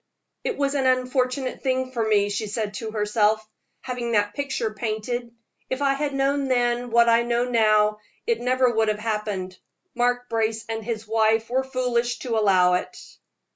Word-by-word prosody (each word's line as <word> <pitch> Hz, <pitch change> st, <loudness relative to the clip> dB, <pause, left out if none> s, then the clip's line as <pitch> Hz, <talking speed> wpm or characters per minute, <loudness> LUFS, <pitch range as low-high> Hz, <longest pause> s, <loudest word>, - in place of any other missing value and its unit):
"It 475 Hz, -, -2 dB
was 280 Hz, -1 st, 0 dB
an 270 Hz, -2 st, +1 dB
unfortunate 255 Hz, 0 st, 0 dB
thing 260 Hz, -1 st, -1 dB
for 235 Hz, -3 st, -1 dB
me," 205 Hz, -2 st, +2 dB
she 210 Hz, +1 st, -2 dB
said 210 Hz, 0 st, -3 dB
to 220 Hz, +3 st, -5 dB
herself, 215 Hz, 0 st, +1 dB, 0.3 s
"having 245 Hz, -2 st, -3 dB
that 205 Hz, -1 st, +2 dB
picture 275 Hz, -5 st, -2 dB
painted. 235 Hz, +2 st, -3 dB, 0.4 s
If 260 Hz, +2 st, -2 dB
I 275 Hz, -1 st, +3 dB
had 280 Hz, 0 st, -2 dB
known 275 Hz, 0 st, +1 dB
then 245 Hz, -1 st, +1 dB
what 235 Hz, 0 st, +4 dB
I 230 Hz, 0 st, +5 dB
know 240 Hz, 0 st, 0 dB
now, 215 Hz, -3 st, +3 dB, 0.3 s
it 465 Hz, -1 st, 0 dB
never 255 Hz, 0 st, +2 dB
would 220 Hz, 0 st, +2 dB
have 215 Hz, -1 st, +1 dB
happened. 210 Hz, -4 st, -3 dB, 0.3 s
Mark 245 Hz, 0 st, 0 dB
Brace 225 Hz, -1 st, -1 dB
and 225 Hz, 0 st, -4 dB
his 220 Hz, -1 st, -4 dB
wife 225 Hz, +1 st, +2 dB
were 260 Hz, +1 st, +2 dB
foolish 250 Hz, -2 st, -1 dB
to 235 Hz, -2 st, -1 dB
allow 185 Hz, -4 st, +4 dB
it." 180 Hz, -, -2 dB
235 Hz, 175 wpm, -24 LUFS, 215-255 Hz, 0.4 s, I